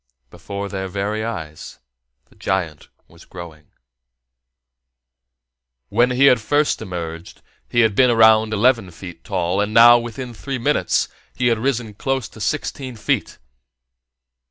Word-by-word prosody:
Before 100 0 -6
their 95 -1 -4
very 100 +3 -3
eyes 80 -10 -7 0.5
the - - -26
giant 85 -6 -3 0.2
was - - -18
growing. 80 -4 -11 2.2
When 120 +1 +3
he 125 +2 +3
had 125 -4 +5
first 145 +6 +1
emerged, 85 -2 -7 0.3
he 120 - +3
had 110 -2 +3
been 125 +4 +4
around 110 -1 +5
eleven 110 -2 +2
feet 90 -1 -11
tall, 95 0 -1
and 105 +1 -2
now, 120 +1 +8
within 120 +1 -7
three 135 +4 -5
minutes, 145 +5 +1 0.3
he 125 -1 +1
had 115 -2 +1
risen 120 -3 -2
close 135 +2 -2
to 110 - -13
sixteen 130 +1 -3
feet. 110 - -2
110 Hz, 130 wpm, -20 LUFS, 95-120 Hz, 2.2 s, now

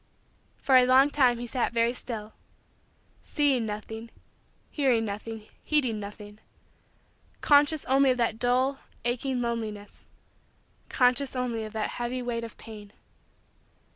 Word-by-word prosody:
For 265 -2 +4
a 250 0 +5
long 265 +3 +5
time 255 -5 +3
he 240 - -5
sat 240 0 -2
very 230 +1 +2
still 220 -4 -6 0.9
seeing 275 -6 0
nothing, 220 +2 -6 0.6
hearing 255 -6 +1
nothing, 215 +1 -6 0.2
heeding 255 -8 +1
nothing 205 +1 -10 1.0
conscious 290 +1 +4
only 270 +1 +4
of 255 - +2
that 225 -2 0
dull, 255 +3 +1 0.3
aching, 245 +1 -1
loneliness 215 -3 -5 0.8
conscious 255 +2 +2
only 240 -3 -2
of 215 - -9
that 220 -1 -2
heavy 250 +1 -3
weight 235 -1 -3
of 230 - -9
pain. 210 -2 -12
240 Hz, 125 wpm, -27 LUFS, 220-260 Hz, 1.0 s, a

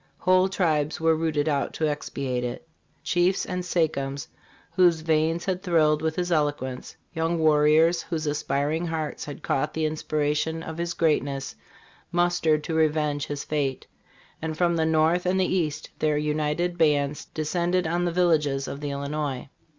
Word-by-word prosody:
Whole 185 +1 +3
tribes 155 -5 0
were 160 0 +3
rooted 155 -2 0
out 140 -2 0
to 155 - 0
expiate 140 -4 -3
it. 120 +5 -5 0.4
Chiefs 180 +2 +1
and 180 -1 -3
sa 180 -1 0
chems, 140 -3 -1 0.5
whose 175 -3 +4
veins 160 +1 +1
had 185 -1 -1
thrilled 155 -4 +2
with 160 0 -1
his 180 0 -2
eloquence; 145 -5 -1 0.2
young 165 0 0
warriors, 155 +2 +4
whose 160 -3 -4
aspiring 150 +2 -1
hearts 160 -2 -3
had 145 -2 -8
caught 135 - -1
the 160 -1 0
inspiration 155 +1 -1
of 160 0 -7
his 170 0 -2
greatness, 140 -4 0 0.6
mustered 175 -3 +2
to 165 - -4
re 160 0 +4
venge 150 -1 -2
his 145 -1 -4
fate; 140 -4 -2 0.6
and 160 -1 -4
from 170 -1 +2
the 160 -1 +1
north 160 +3 +2
and 190 +1 +2
the 185 - +3
east, 155 -5 -2
their 150 -1 +1
united 150 +4 -1
bands 145 -2 +2
descend 170 +3 -1
ed 180 -1 +2
on 175 +2 0
the 175 - 0
villages 155 -6 +1
of 140 - -5
the 145 - -3
Illinois. 140 -1 -3
155 Hz, 165 wpm, -25 LUFS, 150-170 Hz, 0.6 s, whose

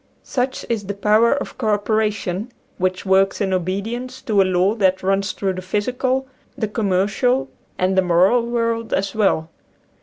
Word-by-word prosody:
Such 255 0 -2
is 215 -4 -2
the 200 - -3
power 215 +3 +3
of 285 - -6
co 215 -4 +2
opera 215 +1 +1
tion, 205 +2 -4 0.3
which 185 +1 -1
works 195 0 +3
in 195 -3 0
obedience 220 +8 -3
to 210 -3 +3
a - - +6
law 185 +2 +2
that 190 -4 +1
runs 195 +1 +1
through 195 -1 -2
the 185 - -6
physical, 250 +7 -1 0.3
the 220 -5 -1
commercial, 210 +5 +1 0.3
and 185 +1 +1
the 190 - +5
moral 185 +7 +3
world 230 -1 -1
as 195 0 -2
well. 190 -7 +1
205 Hz, 170 wpm, -20 LUFS, 190-230 Hz, 0.3 s, a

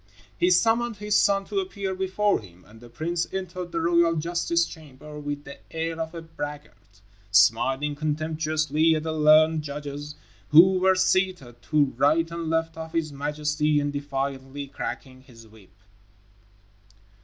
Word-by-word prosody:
He 355 - +2
summoned 235 -6 +2
his 210 +1 -1
son 200 -2 +3
to 395 - -2
appear 200 - -4
before 190 +2 0
him, 90 -3 -16
and 110 +2 -17
the 120 - -13
prince 170 +6 -3
entered 185 -2 -5
the 165 - -2
royal 170 0 +3
justice 170 +1 0
chamber 150 -1 -11
with 145 0 -5
the 140 0 -11
air 165 0 -3
of 160 +1 -5
a 165 - -7
braggart, 145 -10 -9 0.3
smiling 120 +8 +3
contemptuously 155 +1 0
at 155 - -2
the 160 -1 -3
learned 155 +1 +5
judges 145 0 -7 0.3
who 185 +4 +7
were 190 +1 +4
seated 185 -10 0
to 145 -3 +1
right 155 +5 +2
and 170 -1 -4
left 165 0 -1
of 160 0 -7
his 160 -3 -1
majesty, 150 +1 0
and 145 0 -2
defiantly 140 -1 -4
cracking 130 -1 -7
his 115 -4 -16
whip. 110 -3 -19
155 Hz, 150 wpm, -25 LUFS, 140-170 Hz, 0.3 s, who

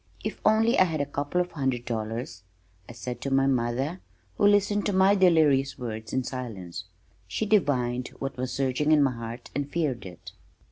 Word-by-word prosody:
"If - - -5
only 220 +2 +4
I 185 - +7
had 160 -4 -2
a 145 - +1
couple 145 +5 -1
of 180 0 -4
hundred 130 -5 -2
dollars," 115 -3 -4 0.5
I - - -8
said 125 +1 -6
to 140 - -2
my 135 0 +3
mother 130 +6 0 0.4
who 205 - +4
listened 205 0 +3
to 205 - 0
my 190 +1 +5
delirious 155 -8 +3
words 110 -2 -6
in 130 - 0
silence. 100 -10 -6 0.4
She 95 - -2
divined 130 - +1
what 135 0 -4
was 130 0 -3
surging 135 +3 0
in 150 -2 +6
my 135 - +2
heart 115 0 -8
and 145 0 -2
feared 135 - -2
it. 90 -2 -11
135 Hz, 185 wpm, -27 LUFS, 120-165 Hz, 0.5 s, I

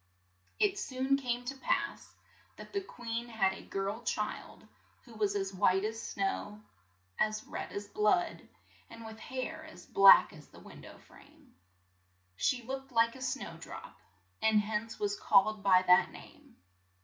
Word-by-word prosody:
It 405 -1 +2
soon 265 -4 0
came 245 -3 -2
to 275 +2 -4
pass - - -2 0.4
that - - -11
the 400 - 0
queen 235 -8 -5
had 205 -5 +1
a - - -10
girl 200 +3 -4
child 210 -2 -4 0.4
who 240 - -15
was 210 -2 0
as 195 -1 -2
white 190 0 +2
as 225 +1 -4
snow, 205 +2 -3 0.6
as 215 0 0
red - - -6
as 205 0 -5
blood, 215 - +1 0.5
and 230 0 -11
with 220 0 -9
hair 260 +7 -5
as 315 - -13
black 195 -2 +7
as 150 -2 -14
the - - -16
win - - -13
dow - - -12
frame. - - -20 0.8
She 245 - 0
looked 270 +2 -6
like 230 0 +3
a 260 - -11
snowdrop, 260 - -6 0.5
and 220 -1 +4
hence 215 +2 -4
was 205 -1 0
called 210 +2 +3
by 185 -2 +5
that 180 0 +5
name. - - -15
220 Hz, 155 wpm, -32 LUFS, 200-255 Hz, 0.8 s, black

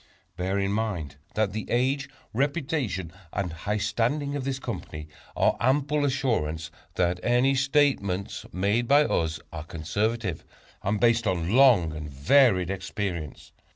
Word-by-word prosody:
Bear 95 +2 -1
in 100 0 0
mind 100 -10 -2 0.2
that 105 -3 +1
the 110 - -5
age, 130 +3 +1 0.2
reputation 135 - -1 0.2
and 90 -4 -2
high 100 +6 -2
standing 120 +8 0
of 135 -2 -3
this 135 -1 -1
Company 75 - -6 0.3
are - - +3
ample 145 +5 +2
assurance 95 - -1 0.2
that 90 0 +1
any 125 +3 +3
statements 135 -9 +1
made 100 +6 +1
by 145 +3 +6
us 80 - 0
are 75 - -5
conservative, 90 +5 -2 0.4
and 100 +2 0
based 115 -1 +3
on 90 +1 0
long 120 -12 +5
and 75 -1 -6
varied 90 - +4
experience. 90 -5 -4
105 Hz, 135 wpm, -26 LUFS, 90-130 Hz, 0.4 s, by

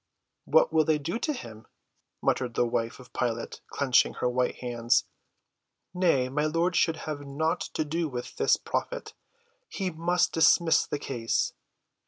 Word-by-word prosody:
"What 160 +1 +4
will 160 -1 +5
they 155 0 +2
do 155 +4 -4
with 300 -4 -1
him?" 110 0 -11 0.6
muttered 125 -3 0
the 120 - +3
wife 115 +1 -2
of 125 -1 -15
Pilate, 115 -2 -3
clenching 135 -3 +2
her - - -1
white 125 0 0
hands. 120 -1 +1 0.9
"Nay, 170 -9 +2
my 145 +4 -1
lord 170 +3 0
should 165 -2 +3
have 150 -2 -4
nought 160 +5 -1
to 155 - 0
do 160 +1 -1
with 125 -2 -6
this - - +3
prophet. - - -4 0.6
He 190 -2 -3
must 175 +2 +1
dismiss 160 +1 +4
the - - -2
case." 120 -5 -1
145 Hz, 155 wpm, -28 LUFS, 125-165 Hz, 0.9 s, will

